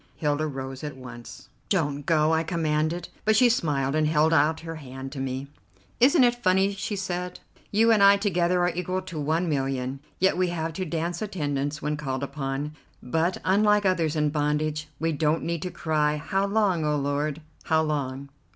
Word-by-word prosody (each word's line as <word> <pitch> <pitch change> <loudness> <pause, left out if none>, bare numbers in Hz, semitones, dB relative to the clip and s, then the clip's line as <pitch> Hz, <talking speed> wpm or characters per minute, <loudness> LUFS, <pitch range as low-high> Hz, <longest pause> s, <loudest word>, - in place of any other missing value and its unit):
Hilda 150 0 0
rose 135 -1 -6
at 150 -3 -5
once. 120 -2 -10 0.2
"Don't 145 -7 0
go," 155 -1 +3
I 160 - +3
commanded; 160 0 -1
but 220 0 +3
she 245 +2 +6
smiled, 140 - 0
and 155 0 +2
held 155 +1 +3
out 155 +1 +3
her 165 -1 -6
hand 135 -2 -8
to 140 - -6
me. 135 0 -3 0.5
"Isn't 270 +3 +6
it 240 0 +2
funny," 190 0 +3
she 200 +1 -4
said; 180 -2 -4 0.3
"you 225 +2 +4
and 215 -2 +4
I 200 0 +7
together 180 -3 +1
are 175 - +2
equal 185 +2 -2
to 175 -4 -6
one 160 +4 0
millionaire, 135 -2 -1 0.2
yet 190 -1 +2
we 185 0 +2
have 165 -2 -3
to 185 +3 -3
dance 170 +2 -3
attendance 145 -7 -2
when 150 0 -1
called 135 -2 -3
upon, 140 +1 -4 0.3
but, 165 +8 0
unlike 210 +1 +3
others 170 -5 +1
in 150 -1 +1
bondage, 150 +1 -1
we 165 0 0
don't 155 +1 +1
need 170 -2 -2
to 180 - -3
cry, 150 -3 0
'How 195 +6 -1
long, 200 -5 +1
O 150 0 +1
Lord! 145 +1 -1 0.3
how 160 0 +3
long? 140 -3 -3
155 Hz, 185 wpm, -26 LUFS, 145-180 Hz, 0.5 s, I